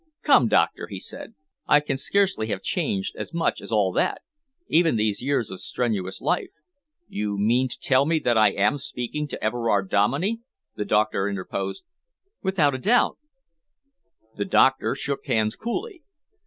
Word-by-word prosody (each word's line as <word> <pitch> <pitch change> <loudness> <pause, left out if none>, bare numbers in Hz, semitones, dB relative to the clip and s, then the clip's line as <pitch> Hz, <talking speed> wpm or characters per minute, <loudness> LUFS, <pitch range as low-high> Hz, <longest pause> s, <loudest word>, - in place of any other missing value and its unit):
"Come, - - +5
Doctor," - - +1
he - - -7
said. 225 - -10 0.3
"I 150 - +6
can 145 -2 -3
scarcely 185 - +1
have 100 -3 -4
changed 195 +1 -2
as - - -6
much 170 - 0
as - - -9
all 105 -4 +2
that. - - 0 0.4
Even 165 -4 +3
these 105 -2 0
years 135 -3 -1
of 95 - -7
strenuous 95 -6 -2
life 410 -7 0 0.3
" 305 +4 -54
"You 105 -1 -3
mean 120 +6 +2
to 125 - -5
tell 135 +1 +3
me 165 0 +2
that 120 -6 +1
I 110 -2 +5
am 105 +8 +1
speaking 135 +3 -4
to - - -7
Everard 110 -3 0
Dominey?" 140 - +1 0.3
the 105 - -4
doctor 105 -2 +1
interposed. 100 - -4 0.6
"Without 180 -7 +2
a 130 - -3
doubt!" 235 - +2 1.2
The 100 - -1
doctor 130 0 +3
shook 140 0 -4
hands 110 -3 +1
coolly. 360 - -5
130 Hz, 160 wpm, -24 LUFS, 105-170 Hz, 1.2 s, I